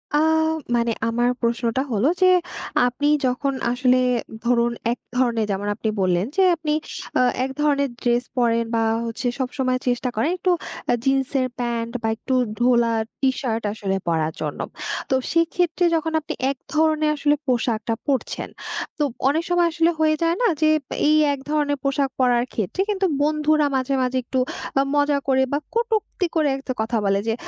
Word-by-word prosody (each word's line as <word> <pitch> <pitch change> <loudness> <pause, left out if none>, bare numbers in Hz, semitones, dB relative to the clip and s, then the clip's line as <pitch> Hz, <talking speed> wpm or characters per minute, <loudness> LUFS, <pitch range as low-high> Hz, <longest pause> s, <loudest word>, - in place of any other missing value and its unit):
আ - - +5 0.6
মানে 235 0 +1 0.2
আমার 240 +1 +1
প্রশ্নটা 235 +1 0
হলো 220 +4 +2
যে, 370 - +6 0.6
আপনি 270 +4 -1 0.2
যখন 260 +2 0 0.2
আসলে 250 0 +3 0.5
ধরুন 240 0 +3 0.2
এক 240 - -3 0.2
ধরণের 235 -3 +2
যেমন 200 +1 -2
আপনি 220 +1 -2
বললেন 180 0 +2
যে - - +5
আপনি 315 -2 -3 0.5
আ - - +5 0.2
এক 265 - -2
ধরনের 280 -2 +2
ড্রেস 240 0 +2
পরেন 230 -1 +2
বা 225 - +2 0.2
হচ্ছে 230 +2 -3
সবসময় 255 0 -1
চেষ্টা 245 +1 0
করেন 225 +8 +1
একটু 365 - +1 0.4
আ - - +4
জিন্সের 270 -1 +1
প্যান্ট 235 -1 -2
বা 225 - -1
একটু 260 +4 -4 0.2
ঢোলা 240 -1 +3 0.3
টি-শার্ট 260 -4 0
আসলে 200 -3 -2
পরার 160 -1 0
জন্য। 150 -2 -3 0.5
তো 265 - +3 0.2
সেক্ষেত্রে 335 +1 +1
যখন 320 0 -1
আপনি 300 - -5 0.2
এক 275 - -7 0.2
ধরণের 310 0 +2
আসলে 295 0 +2
পোশাকটা 230 -2 0
পড়ছেন, 275 -2 -1 0.5
তো 300 - +1 0.3
অনেক 320 +4 +1
সময় 350 -1 +3
আসলে 330 +1 +2
হয়ে 310 0 +3
যায় 335 0 +2
না 485 - +4
যে, 310 - +5 0.4
এই 305 - +5 0.2
এক 280 - -5
ধরনের 295 -1 +1
পোশাক 275 0 +1
পরার 245 -1 +3
ক্ষেত্রে 220 - -2
কিন্তু 395 -2 +1 0.2
বন্ধুরা 305 0 +2
মাঝে, 265 +1 0
মাঝে 255 0 0
একটু 260 +2 -2 0.4
আ - - +5
মজা 290 0 +3
করে 265 -1 +3
বা 285 - +2 0.2
কটুক্তি 445 -5 0
করে 310 -2 +3
একটা 270 -1 -4
কথা 225 +1 -1
বলে 195 0 +2
যে, 225 - +2
260 Hz, 165 wpm, -22 LUFS, 235-300 Hz, 0.6 s, যে